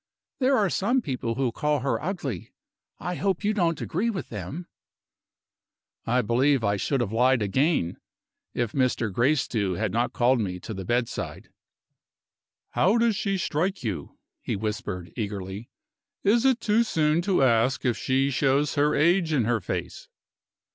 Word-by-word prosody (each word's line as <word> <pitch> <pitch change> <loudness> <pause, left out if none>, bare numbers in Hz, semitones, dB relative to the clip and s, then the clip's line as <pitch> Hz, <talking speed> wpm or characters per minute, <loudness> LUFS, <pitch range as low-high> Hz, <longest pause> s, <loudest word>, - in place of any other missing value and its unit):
There 265 0 +3
are 200 -5 +2
some 240 +6 +1
people 125 -5 -3
who 130 -2 0
call 150 +3 0
her 125 -4 -1
ugly. 150 - -4 0.5
I 180 - -3
hope 195 +1 -1
you 210 +1 +2
don't 170 -6 +1
agree 205 +8 -1
with 185 -9 -4
them?" 110 - -6 1.4
I 125 +2 +2
believe 125 +4 +2
I 100 -1 +2
should 135 +6 0
have 110 -4 -2
lied 125 +1 +3
again, 105 - +1 0.6
if 120 -3 -1
Mr. 125 -5 0
Gracedieu 120 -6 +1
had - - -1
not 120 +2 0
called 125 +1 +2
me 90 -4 -2
to 110 - -6
the 95 -2 -6
bedside. 120 +3 -2 1.2
"How 205 +6 +3
does 230 -2 +2
she 195 -1 -1
strike 180 0 -1
you?" 95 - -4 0.2
he - - -2
whispered, 100 -4 -4
eagerly. 100 -1 -5 0.5
"Is 230 +5 +3
it 260 -3 +4
too 220 +1 +2
soon 160 -7 +2
to 185 -5 +2
ask 120 +1 +2
if 120 -3 +2
she 135 +4 +1
shows 140 +2 +2
her 150 +1 +2
age 170 +1 +3
in 135 -7 +2
her 120 0 +1
face?" - - -5
130 Hz, 155 wpm, -26 LUFS, 115-175 Hz, 1.4 s, it